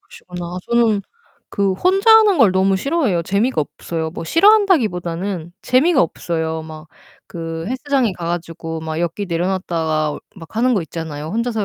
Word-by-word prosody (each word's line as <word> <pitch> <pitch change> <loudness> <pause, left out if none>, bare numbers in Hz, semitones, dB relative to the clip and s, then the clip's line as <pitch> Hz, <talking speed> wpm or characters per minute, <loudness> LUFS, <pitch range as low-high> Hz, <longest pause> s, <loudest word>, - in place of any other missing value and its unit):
그러시구나. 180 0 -8
저는 230 -4 +2 0.5
그 200 -1 +1
혼자 385 - +2
하는 435 -3 +7
걸 220 - +6
너무 190 +1 +2
싫어해요. 270 - 0
재미가 200 +4 0
없어요. 160 +2 -4
뭐 165 - -7
싫어한다기 380 - +4
보다는 175 -1 -5
재미가 270 +4 +3
없어요. 160 -1 -3
막 155 0 -11 0.4
그 165 -1 -6
헬스장에 255 -2 0
가 170 -1 -7
가지고 165 -1 -4
막 160 0 -4
역기 175 +4 -2
내려놨다가 165 -4 -1 0.2
막 170 +4 -12
하는 250 +2 +3
거 195 - 0
있잖아요. 160 -2 -6
혼자서 230 -1 -1
185 Hz, 355 characters per minute, -19 LUFS, 165-240 Hz, 0.5 s, 하는